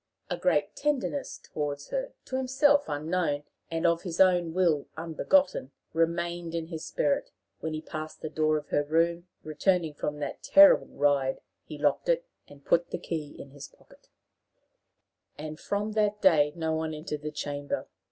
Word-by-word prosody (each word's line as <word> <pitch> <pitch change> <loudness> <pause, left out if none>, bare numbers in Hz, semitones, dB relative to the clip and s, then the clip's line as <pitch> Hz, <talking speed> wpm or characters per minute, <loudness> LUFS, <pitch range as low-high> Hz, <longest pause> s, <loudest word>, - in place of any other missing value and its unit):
A - - +1
great - - +1
tenderness 290 -1 -1
toward 145 -2 -4
her, - - -2
to 260 - -5
himself 270 +2 +3
unknown, 150 0 -1 0.3
and 165 +1 -2
of 170 0 +3
his 175 -3 -5
own 180 -3 +4
will 165 -5 +2
unbegotten, 165 - +1 0.2
remained 170 +1 -1
in 165 -1 -3
his 160 -2 -6
spirit. 145 - 0 0.3
When 160 -1 -3
he 155 - -5
passed 155 0 -7
the - - -3
door 155 -1 +2
of 150 -1 -7
her 145 - +2
room, 170 +3 +1 0.2
returning 160 +1 +1
from 150 0 -3
that 145 - -5
terrible 295 0 +7
ride, 140 -2 +1 0.2
he 150 - -8
locked 145 - +1
it, - - +2 0.2
and 145 -1 -16
put 170 0 +2
the - - -3
key 160 -4 -5
in 140 - -10
his 140 -1 -9
pocket, - - -23 1.3
and 155 +1 -7
from 205 +1 -2
that 210 -1 +1
day 155 -7 +5
no 160 -1 -1
one 160 0 -2
entered 150 -1 -5
the 150 - -3
chamber. 145 -1 -4
160 Hz, 165 wpm, -28 LUFS, 150-180 Hz, 1.3 s, terrible